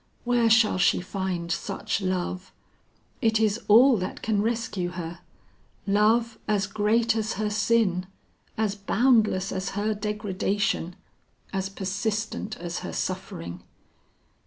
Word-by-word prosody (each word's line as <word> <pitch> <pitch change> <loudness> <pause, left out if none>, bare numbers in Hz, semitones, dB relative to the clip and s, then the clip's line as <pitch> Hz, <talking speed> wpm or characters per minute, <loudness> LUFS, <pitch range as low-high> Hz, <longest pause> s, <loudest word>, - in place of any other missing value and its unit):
Where 240 -2 +3
shall 220 -4 +4
she 195 - +4
find 180 -2 -3
such 200 +1 -2
love? 185 0 -2 0.7
It 220 -2 +3
is 215 0 +1
all 240 +4 +7
that 185 -1 -5
can 210 -2 +1
rescue 220 -5 -1
her; 170 -1 -6 0.7
love 220 +3 +2
as 205 -2 +1
great 215 +3 +1
as 220 0 -1
her 210 0 -2
sin, 210 -4 +1 0.5
as 215 -2 +1
boundless 210 -1 +2
as 190 0 -2
her 215 +1 +1
degradation, 205 -3 -1 0.6
as 190 0 -1
persistent 210 +3 -3
as 175 0 -4
her - - -6
suffering. 85 - -4
205 Hz, 120 wpm, -26 LUFS, 185-220 Hz, 0.7 s, all